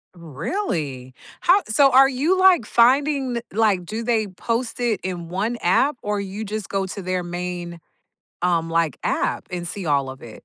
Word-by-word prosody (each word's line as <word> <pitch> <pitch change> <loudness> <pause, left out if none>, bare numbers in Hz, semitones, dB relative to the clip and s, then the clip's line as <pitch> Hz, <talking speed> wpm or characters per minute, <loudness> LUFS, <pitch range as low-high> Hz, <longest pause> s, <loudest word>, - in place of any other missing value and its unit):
Really? 150 - -4 0.3
How 375 +4 +5
so 270 +5 +4
are 270 +1 +7
you, 300 +9 +1
like, 370 - +5
finding 265 +2 +3
th 235 - -3
like, 205 -5 +2
do 220 +5 -4
they 225 -2 +1
post 230 +6 -3
it 230 -5 0
in 175 -3 -5
one 210 +6 -2
app? 255 +11 +2
Or, 210 0 -2
you 200 +2 -5
just 215 -1 -5
go 195 -1 -1
to 195 - -6
their 185 0 -2
main, 175 -1 -5 0.6
um, 165 -2 +1
like, 165 -4 0
app - - -1
and 175 -1 -4
see 190 +1 -5
all 140 -3 +1
of 130 0 -9
it? 115 -2 -12
200 Hz, 180 wpm, -22 LUFS, 175-240 Hz, 0.6 s, are